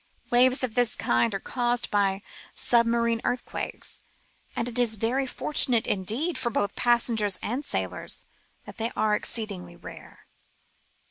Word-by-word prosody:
Waves 255 +2 +5
of 245 -4 -1
this 245 -1 +2
kind 120 - +1
are - - -2
caused 240 +2 -1
by 200 -1 +1 0.3
submarine 235 -1 +2
earthquakes, 245 0 -3 0.6
and 235 - -1
it 245 0 0
is 235 -3 +3
very 245 +6 0
fortunate, 250 -3 +1
indeed, 225 - 0
both 205 -4 0
for - - -33
passengers 230 -4 +2
and 250 +6 -2
sailors, - - -2 0.4
that - - -11
they 225 0 -1
are 215 -1 +2
exceedingly 200 -6 -2
rare. - - -12
235 Hz, 135 wpm, -26 LUFS, 210-245 Hz, 0.6 s, Waves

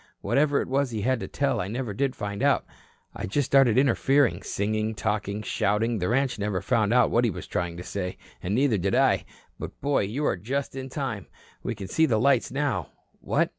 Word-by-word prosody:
Whatever 140 +7 +2
it - - -9
was 135 +1 +1
he 110 -3 -3
had 130 0 +1
to - - -5
tell, 140 -3 0
I 90 - -3
never 115 0 -3
did 135 +5 -1
find 100 -1 -4
out. - - +3 0.5
I - - -5
just 140 +8 0
started 135 -3 +4
interfering, 135 0 +3
singing, 110 +2 -1
talking, 105 -1 -2
shouting. 110 +2 0
The 90 - -1
ranch 130 -1 +1
never 100 -2 -1
found 105 +2 +1
out 125 +1 +4
what 120 - +3
he 120 - +3
was 95 - -6
trying 85 -1 -3
to 90 - -6
say, 90 -1 -4 0.2
and 95 +4 -1
neither 125 -5 +2
did 95 +2 0
I. - - +3 0.3
But, - - -7
boy, 140 -6 +1
you're 115 +1 -1
just 130 +9 -3
in 135 0 -5
time. 125 -9 -4 0.3
We 120 - -3
can 100 -2 -7
see 160 +12 +3
the 115 -6 +2
lights 135 0 +3
now. 135 - -1 0.3
What? - - +1
115 Hz, 210 wpm, -26 LUFS, 100-135 Hz, 0.5 s, started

